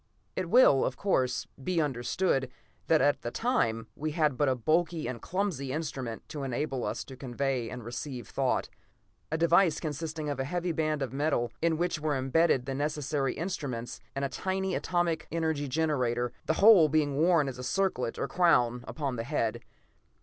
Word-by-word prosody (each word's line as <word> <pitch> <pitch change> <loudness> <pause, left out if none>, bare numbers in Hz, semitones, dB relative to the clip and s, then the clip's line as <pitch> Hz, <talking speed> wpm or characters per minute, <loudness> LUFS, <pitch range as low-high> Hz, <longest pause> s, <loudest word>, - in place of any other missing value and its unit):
It 175 - -2
will, 205 - +6
of - - -2
course, 125 - +1 0.2
be 180 +3 0
understood 135 0 0 0.4
that 160 -2 +4
at 145 - +2
that 120 - -5
time 115 - +1
we 155 +1 -3
had 150 -4 +2
but 145 +1 +2
a 130 - +2
bulky 160 +6 +1
and 120 -2 -5
clumsy 175 -8 -2
instrument 135 -6 -4
to 150 - -5
enable 135 0 -2
us - - -3
to 135 - -11
convey 130 -2 -2
and 125 -1 -7
receive 120 0 -6
thought; - - 0 0.6
a 160 - +1
device 170 +1 +4
consisting 155 0 -4
of 145 -2 -3
a - - +1
heavy 175 +5 -2
band 155 -3 0
of 130 - -5
metal, 135 -5 0
in 165 -1 +2
which 175 -1 -1
were 150 -1 0
imbedded 135 0 +2
the 135 - -3
necessary 145 -1 -1
instruments 140 -9 -4 0.2
and 140 0 -1
a - - -2
tiny 190 +6 -2
atomic 175 -3 0
energy 160 -3 -1
generator, 125 -5 0
the 160 - +3
whole 195 -4 +7
being 145 -2 +1
worn 165 -2 +4
as 125 -2 -5
a - - -5
circlet 130 -4 0
or - - -1
crown 125 -9 +3
upon 140 -5 -3
the 115 - -2
head. 115 -4 -1
145 Hz, 180 wpm, -29 LUFS, 130-165 Hz, 0.6 s, whole